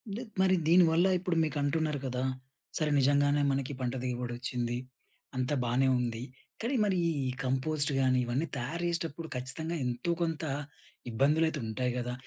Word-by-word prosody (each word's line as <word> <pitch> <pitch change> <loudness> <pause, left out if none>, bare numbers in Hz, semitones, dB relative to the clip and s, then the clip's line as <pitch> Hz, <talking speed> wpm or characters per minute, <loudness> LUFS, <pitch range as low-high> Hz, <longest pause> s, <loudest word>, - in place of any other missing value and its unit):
లేద్ 230 0 -7
మరి 190 0 +5
దీనివల్ల, 170 +1 +5
ఇప్పుడు 180 -1 -1
మీకంటున్నారు 150 0 0
కదా! 125 -1 -2 0.5
సరే, 155 -1 +1
నిజంగానే 145 +1 +3
మనకి 135 0 -1
పంట 125 -1 -1
దిగుబడొచ్చింది, 120 -1 -2 0.6
అంతా 130 +3 0
బానే 125 +3 +2
ఉంది, 120 -1 -2 0.4
కాని, 240 +5 0
మరి 195 -3 +1
ఈ - - +2 0.2
ఈ - - 0 0.2
కంపోస్టు 145 +3 +2
గానీ, 130 -1 +3
ఇవన్నీ 130 +7 -1
తయారు 150 +9 -3
చేసేటప్పుడు, 165 -1 -3
ఖచ్చితంగా 160 +7 -3
ఎంతో 125 +7 -1
కొంత 165 -1 -1 0.7
ఇబ్బందులైతే 150 +6 +2
ఉంటాయి 125 +3 -1
గదా! 125 0 -2
145 Hz, 140 wpm, -30 LUFS, 125-165 Hz, 0.7 s, మరి